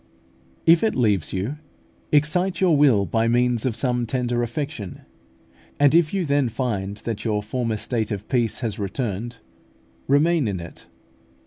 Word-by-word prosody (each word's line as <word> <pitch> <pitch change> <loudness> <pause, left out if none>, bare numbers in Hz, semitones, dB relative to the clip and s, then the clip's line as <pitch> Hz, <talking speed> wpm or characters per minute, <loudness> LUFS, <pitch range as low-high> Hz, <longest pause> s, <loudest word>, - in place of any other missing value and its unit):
If 165 0 +6
it 220 - +1
leaves 105 - +1
you, 105 +11 -3 0.5
excite 170 +5 +2
your 180 -4 +4
will 130 -9 +4
by 115 +6 0
means 120 0 +1
of 120 - 0
some 125 -2 0
tender 120 0 -1
affection, 120 - -5 0.8
and 145 0 +5
if 165 -2 +4
you 195 -3 -1
then 140 -3 +1
find 105 -5 -3
that 115 -2 -5
your 105 -2 -1
former 115 0 -2
state 110 0 -2
of 100 -1 -5
peace 120 -3 0
has 110 -4 -3
returned, 115 +2 -3 0.7
remain 150 0 +3
in 95 -3 -2
it. 85 0 -11
120 Hz, 150 wpm, -23 LUFS, 105-145 Hz, 0.8 s, If